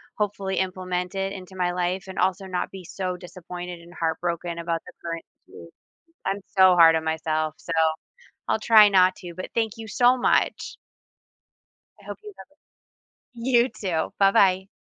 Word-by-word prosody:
hopefully 200 -2 -2
implement 185 0 -3
it 195 0 -2
into 190 -1 -10
my 180 -1 0
life, 180 +1 -2
and 190 - -7
also 190 +1 +1
not 180 -1 -3
be 190 -2 -10
so 185 +1 -4
disappointed 180 -1 -8
and 170 +1 -15
heartbroken 170 0 -3
about 170 -1 -2
the - - -12
current 165 -1 -5 0.2
situation. - - -13 0.5
I'm 195 +1 -1 0.2
so 185 -1 +7
hard 165 -1 +7
on 160 - -5
myself, 155 -1 -1
so 170 - -8 0.8
I'll - - +2
try 215 -2 +7
not 185 -1 +4
to, 175 -2 -9
but 185 - -7
thank 225 -2 0
you 225 -1 -8
so 245 +3 +3
much. - - 0 1.2
I - - -19
hope - - -7
you 420 -1 -10
have - - -12
a - - -28 0.8
you 240 +1 +2
too, 170 -6 -3
bye-bye. 195 -1 +4
185 Hz, 165 wpm, -24 LUFS, 175-195 Hz, 1.2 s, so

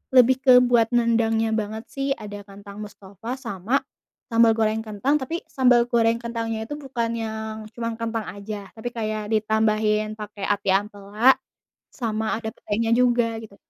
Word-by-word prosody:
lebih 255 0 +7
ke 255 -2 +8
buat 240 -2 +4
nendangnya 225 -2 +2
banget 220 +1 -3
sih, 275 0 -4
ada 205 -1 -8
kentang 200 +1 -10
mustofa 205 +5 -8
sama 205 +6 -1 0.5
sambal 230 -1 +5
goreng 220 0 +1
kentang, 220 +7 0
tapi 300 +4 -2
sambal 245 -3 +4
goreng 230 -1 +3
kentangnya 230 -2 -3
itu 295 - -4
bukan 265 -5 -3
yang 220 -1 -4 0.2
cuman 230 0 -3
kentang 225 -1 -3
aja, 200 0 -7
tapi 225 +2 -4
kayak 215 -2 -3
ditambahin 215 0 +1
pakai 210 -1 -7
ati 205 -1 0
ampela, 205 +5 +2 0.5
sama 220 -3 -2
ada 220 -1 -4
petenya 225 +2 -2
juga 240 -2 +2
gitu. 210 -3 -12
225 Hz, 150 wpm, -24 LUFS, 215-235 Hz, 0.5 s, ke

